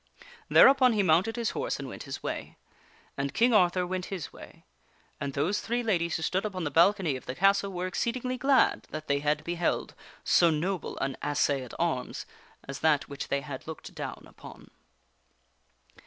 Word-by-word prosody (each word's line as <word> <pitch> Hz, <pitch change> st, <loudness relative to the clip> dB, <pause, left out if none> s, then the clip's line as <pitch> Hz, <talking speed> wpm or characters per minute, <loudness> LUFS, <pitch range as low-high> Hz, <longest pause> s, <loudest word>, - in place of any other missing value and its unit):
Thereupon 265 Hz, -2 st, +7 dB
he 210 Hz, -2 st, +2 dB
mounted 185 Hz, +6 st, +3 dB
his 235 Hz, -2 st, -1 dB
horse 475 Hz, +3 st, -2 dB
and -, -, -6 dB
went -, -, -8 dB
his -, -, -6 dB
way. -, -, -5 dB, 0.6 s
And 140 Hz, 0 st, -3 dB
King 240 Hz, +1 st, +4 dB
Arthur 180 Hz, -3 st, +3 dB
went 185 Hz, 0 st, -3 dB
his 190 Hz, -5 st, -6 dB
way. -, -, -14 dB, 0.5 s
And 140 Hz, -1 st, -4 dB
those 160 Hz, +9 st, 0 dB
three 240 Hz, +1 st, -1 dB
ladies 170 Hz, -7 st, 0 dB
who 160 Hz, -, -3 dB
stood 185 Hz, +4 st, 0 dB
upon 190 Hz, -4 st, -4 dB
the 145 Hz, -, -2 dB
balcony 170 Hz, -1 st, +3 dB
of 130 Hz, -, -9 dB
the 125 Hz, -, -4 dB
castle 195 Hz, +3 st, +3 dB
were 180 Hz, -1 st, -3 dB
exceedingly 245 Hz, +7 st, -2 dB
glad 270 Hz, +1 st, +2 dB
that 155 Hz, 0 st, -6 dB
they 140 Hz, 0 st, +1 dB
had 150 Hz, +1 st, 0 dB
beheld 175 Hz, +1 st, -1 dB, 0.3 s
so 170 Hz, -, +4 dB
noble 170 Hz, +3 st, -2 dB
an 135 Hz, -1 st, -2 dB
assay 145 Hz, -1 st, +1 dB
at 125 Hz, -, -10 dB
arms -, -, -2 dB, 0.4 s
as 135 Hz, 0 st, -6 dB
that 155 Hz, -3 st, +2 dB
which 140 Hz, -1 st, -6 dB
they 140 Hz, -, -1 dB
had 135 Hz, +1 st, -8 dB
looked 160 Hz, -, -8 dB
down -, -, -6 dB
upon. -, -, -14 dB
175 Hz, 180 wpm, -28 LUFS, 150-210 Hz, 0.6 s, Thereupon